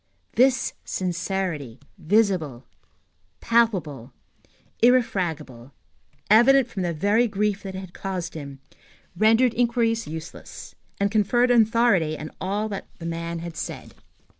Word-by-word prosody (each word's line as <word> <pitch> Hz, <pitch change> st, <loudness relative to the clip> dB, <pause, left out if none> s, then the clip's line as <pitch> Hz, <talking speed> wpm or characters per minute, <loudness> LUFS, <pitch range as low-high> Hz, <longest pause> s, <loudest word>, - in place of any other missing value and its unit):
This 260 Hz, 0 st, +2 dB
sincerity, 175 Hz, -, -3 dB, 0.2 s
visible, 180 Hz, -, 0 dB, 0.7 s
palpable, 180 Hz, -, 0 dB, 0.7 s
irrefragable, 170 Hz, -, 0 dB, 0.5 s
evident 245 Hz, +4 st, +5 dB
from 210 Hz, -5 st, -5 dB
the 175 Hz, -1 st, -1 dB
very 205 Hz, +9 st, +2 dB
grief 205 Hz, -1 st, -1 dB
that 190 Hz, -1 st, -7 dB
it 190 Hz, -1 st, -8 dB
caused 185 Hz, -3 st, -5 dB
him, 140 Hz, -3 st, -9 dB, 0.5 s
rendered 225 Hz, +5 st, +4 dB
inquiries 230 Hz, -1 st, 0 dB
useless, 160 Hz, +1 st, -9 dB, 0.3 s
and 200 Hz, 0 st, +1 dB
conferred 240 Hz, +4 st, +2 dB
authority 225 Hz, -9 st, +3 dB
on 155 Hz, +1 st, -7 dB
all 205 Hz, +3 st, -1 dB
that 200 Hz, -2 st, -6 dB
that 165 Hz, -, -9 dB
man 170 Hz, 0 st, -4 dB
had 170 Hz, -1 st, -7 dB
said. -, -, -7 dB
195 Hz, 115 wpm, -24 LUFS, 165-230 Hz, 0.7 s, evident